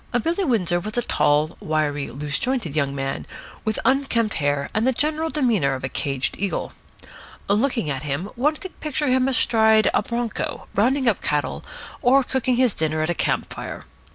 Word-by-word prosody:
Billy 345 +4 0
Windsor 185 - +1
was 210 +5 -5
a 240 - +2
tall, 150 -2 +2
wiry, 150 -2 -1
loose 145 +4 -3
jointed 245 - -1
young 140 -2 0
man, 135 0 -3 0.4
with 215 -1 -1
unkempt 255 -4 +2
hair 145 -1 0
and 215 +4 +1
the - - +5
general 310 +5 0
demeanour 225 - +1
of 130 - -7
a 130 - -1
caged 135 -1 -1
eagle. 200 -1 -2 0.7
Looking 225 - +1
at 135 -3 -2
him, 150 +7 -3
one 290 +6 +2
could 375 +2 -10
picture 300 -1 -1
him 255 0 +3
astride 220 -4 +4
of 205 - +2
a - - -11
bronco, 235 -1 -3
rounding 255 +6 +2
up 220 - +2
cattle, 150 -1 -1 0.4
or 270 +1 +5
cooking 255 -1 0
his 250 -4 +3
dinner 155 0 0
at 165 - 0
a - - +1
camp - - -1
fire. - - -7
215 Hz, 180 wpm, -23 LUFS, -, 0.7 s, the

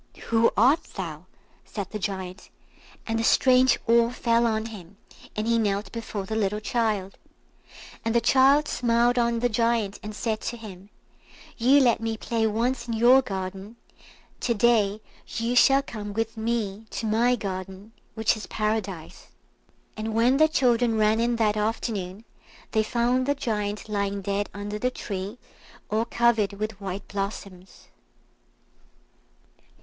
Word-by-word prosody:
"Who 230 0 +4
art 265 +10 +4
thou?" 170 -3 -6 0.4
said 200 -3 -6
the 215 - -4
Giant, 190 -1 -5 0.6
and 225 0 -1
a - - 0
strange 255 +2 +4
awe 235 0 +4
fell 235 -1 +1
on 220 -1 -1
him, 200 -4 -10 0.4
and 215 - -2
he 230 0 +3
knelt 205 -1 -1
before 220 -4 -5
the 220 - -4
little 210 -1 0
child. 215 -4 -1 0.8
And 225 +1 -1
the - - +6
child 275 +5 +4
smiled 240 0 +2
on 235 -1 +1
the 245 - +3
Giant, 230 -3 0
and 210 0 -7
said 220 0 -2
to 240 - -4
him, 200 -3 -11 0.7
"You 265 +4 +5
let 240 -4 +3
me 225 -1 -2
play 225 0 0
once 235 +3 -1
in 230 - -2
your 245 +4 +6
garden, 195 0 -6 0.6
to 235 - 0
day 215 -2 +2 0.3
you 230 +2 -2
shall 270 +2 +5
come 205 -4 -7
with 225 +1 -2
me 220 -2 -3
to - - -4
my 230 +3 +3
garden, 190 0 -6 0.2
which 220 +1 +2
is 215 - -8
Paradise." 210 -6 -3 0.7
And 220 0 -4
when 240 +4 +4
the 310 +1 +6
children 245 -6 +2
ran 215 +1 +3
in 235 +1 +1
that 215 -2 +1
afternoon, 210 -2 -3 0.5
they 220 - +2
found 245 +3 0
the 285 - +2
Giant 210 -5 -3
lying 200 -1 -2
dead 200 +1 -1
under 205 +1 -5
the 250 - +1
tree, 200 -2 -6 0.5
all 220 +2 +1
covered 235 -4 +2
with 210 0 -5
white 195 0 -5
blossoms. 195 - -6
220 Hz, 150 wpm, -25 LUFS, 205-235 Hz, 0.8 s, the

